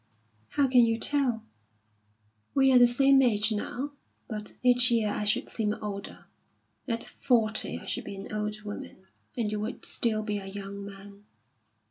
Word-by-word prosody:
"How 280 -2 +4
can 250 -2 +5
you 230 -1 +2
tell? 255 -4 +1 1.1
We 270 -1 +5
are 250 - +7
the 245 - +7
same 270 +3 +5
age 215 -3 +3
now, 245 +6 -3 0.4
but 210 -2 -6
each 245 0 +5
year 225 -3 +2
I 210 - -2
should 210 - +1
seem 210 -2 -2
older. 200 -2 -7 0.6
At 230 -2 -2
forty 225 -4 +1
I - - -11
should - - -3
be - - -6
an 195 +2 -8
old 210 0 -3
woman, 205 -2 -8 0.3
and 220 -3 -1
you 210 - -2
would 215 +4 -5
still 215 -2 +1
be 210 -1 -2
a 195 - -8
young 200 0 -7
man. 200 +1 -12
215 Hz, 165 wpm, -28 LUFS, 210-245 Hz, 1.1 s, are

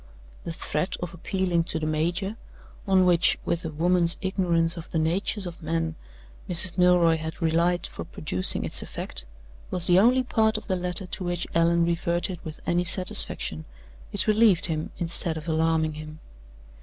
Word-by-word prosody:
The - - -4
threat 155 +1 -3
of 175 -1 -6
appealing 175 -1 -1
to 165 - -2
the 155 - -3
major 170 +6 -2 0.5
on 190 -1 +4
which, 175 -2 +3
with 170 0 -2
a 165 - -4
woman's 170 +2 +4
ignorance 175 -3 +1
of 170 -2 -9
the - - -3
natures 185 +5 -1
of 175 0 -8
men, 165 0 -2 0.6
Mrs. 175 0 +2
Milroy 180 -2 +4
had 160 0 -7
relied 170 +1 +1
for - - -7
producing 95 - -2
its - - +5
effect - - -6 0.4
was 180 -2 0
the 180 +1 +5
only 250 +5 +4
part 220 -3 +1
of 215 - -9
the 190 - -1
letter 180 +2 -1
to 185 +1 -5
which 175 -1 -2
Allan 170 0 +2
reverted 170 +1 -1
with 155 -2 -9
any 175 +1 +1
satisfaction: 175 - +2 0.5
it 205 - +2
relieved 215 -6 +3 0.3
instead 165 -1 -1
of 155 +1 -9
alarming 160 -1 0
him. 155 0 -9
170 Hz, 165 wpm, -25 LUFS, 165-185 Hz, 0.6 s, its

